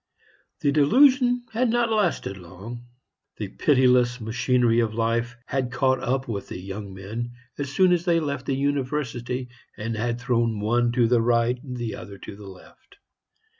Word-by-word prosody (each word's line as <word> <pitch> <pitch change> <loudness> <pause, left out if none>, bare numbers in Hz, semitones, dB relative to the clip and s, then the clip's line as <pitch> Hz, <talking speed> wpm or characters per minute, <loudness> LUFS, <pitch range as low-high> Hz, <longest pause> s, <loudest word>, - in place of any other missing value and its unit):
The 145 - +2
delusion 245 - +4
had 240 +2 +2
not 235 0 +1
lasted 210 - 0
long. 100 +7 -10 0.5
The 105 -3 -4
pitiless 125 -1 +3
machinery 120 +1 +2
of 110 -2 0
life 120 +1 0
had 130 -2 -2
caught 130 +1 +2
up 130 +2 -1
the 105 -5 -5
young 100 +2 -7
men 110 +6 -6 0.3
as 140 -1 -3
soon 185 +5 +4
as 175 -1 +1
they 170 -2 +3
left 140 -4 -3
the 135 - +1
university, 130 -3 -2 0.3
and 115 +2 -3
had 120 +2 -2
thrown 120 -3 0
one 120 +3 +2
to 120 -1 +3
the 120 0 +3
right, 120 +1 +2
the 120 -5 -4
other 100 -1 -9
to 100 - -9
the 100 -1 -11
left. 95 - -17
120 Hz, 160 wpm, -25 LUFS, 115-140 Hz, 0.5 s, delusion